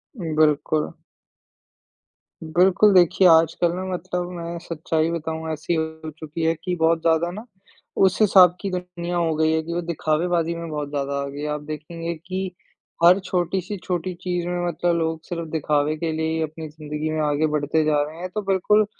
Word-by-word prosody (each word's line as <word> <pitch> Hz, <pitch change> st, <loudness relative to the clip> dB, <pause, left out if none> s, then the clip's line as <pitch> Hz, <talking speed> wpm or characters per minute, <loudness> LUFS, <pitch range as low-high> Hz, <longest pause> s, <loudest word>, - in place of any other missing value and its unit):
उम, 165 Hz, -8 st, -4 dB
बिल्कुल। 155 Hz, 0 st, +2 dB, 1.5 s
बिल्कुल, 185 Hz, +5 st, +4 dB
देखिए 180 Hz, +1 st, +5 dB
आजकल 165 Hz, +1 st, +4 dB
ना 185 Hz, -, -4 dB
मतलब 180 Hz, 0 st, -3 dB
मैं 170 Hz, 0 st, -5 dB
सच्चाई 160 Hz, -1 st, -1 dB
बताऊँ 160 Hz, -1 st, -3 dB
ऐसी 155 Hz, +2 st, -2 dB
हो 160 Hz, 0 st, -3 dB
चुकी 160 Hz, +1 st, -5 dB
है 165 Hz, -, +3 dB
कि 180 Hz, 0 st, -1 dB
बहुत 165 Hz, 0 st, +2 dB
ज़्यादा 165 Hz, +1 st, +2 dB
ना, 215 Hz, +5 st, -8 dB, 0.5 s
उस 190 Hz, -2 st, +3 dB
हिसाब 185 Hz, -4 st, +7 dB
की 200 Hz, -, -2 dB
दुनिया 175 Hz, -1 st, -4 dB
हो 165 Hz, -2 st, +1 dB
गई 160 Hz, 0 st, +2 dB
है 160 Hz, 0 st, +1 dB
कि 170 Hz, +1 st, -5 dB
वो 175 Hz, -, -1 dB
दिखावेबाज़ी 170 Hz, +1 st, 0 dB
में 170 Hz, 0 st, -6 dB
बहुत 150 Hz, -2 st, -4 dB
ज़्यादा 140 Hz, -1 st, -2 dB
आ -, -, -2 dB
गई 140 Hz, +1 st, -7 dB
है, 150 Hz, -, -2 dB
आप 150 Hz, 0 st, -3 dB
देखेंगे 160 Hz, +3 st, -5 dB
कि 185 Hz, +3 st, -5 dB, 0.5 s
हर 180 Hz, +3 st, +7 dB
छोटी-सी 185 Hz, +1 st, -2 dB
छोटी 180 Hz, 0 st, -2 dB
चीज़ 175 Hz, -1 st, -2 dB
में 175 Hz, 0 st, -1 dB
मतलब 175 Hz, +1 st, 0 dB
लोग 160 Hz, -1 st, -1 dB
सिर्फ 170 Hz, -2 st, -5 dB
दिखावे 150 Hz, -1 st, +1 dB
के 165 Hz, 0 st, -2 dB
लिए 160 Hz, 0 st, -1 dB
ही 160 Hz, -, -1 dB
अपनी 155 Hz, 0 st, -4 dB
ज़िंदगी 150 Hz, 0 st, -5 dB
में 155 Hz, -, -1 dB
आगे 150 Hz, +1 st, +1 dB
बढ़ते 150 Hz, +2 st, +1 dB
जा 150 Hz, -1 st, +3 dB
रहे 155 Hz, +2 st, -8 dB
हैं। 185 Hz, -, -4 dB
तो 210 Hz, -, 0 dB
बिल्कुल 200 Hz, +2 st, +3 dB
165 Hz, 185 wpm, -23 LUFS, 155-175 Hz, 1.5 s, हिसाब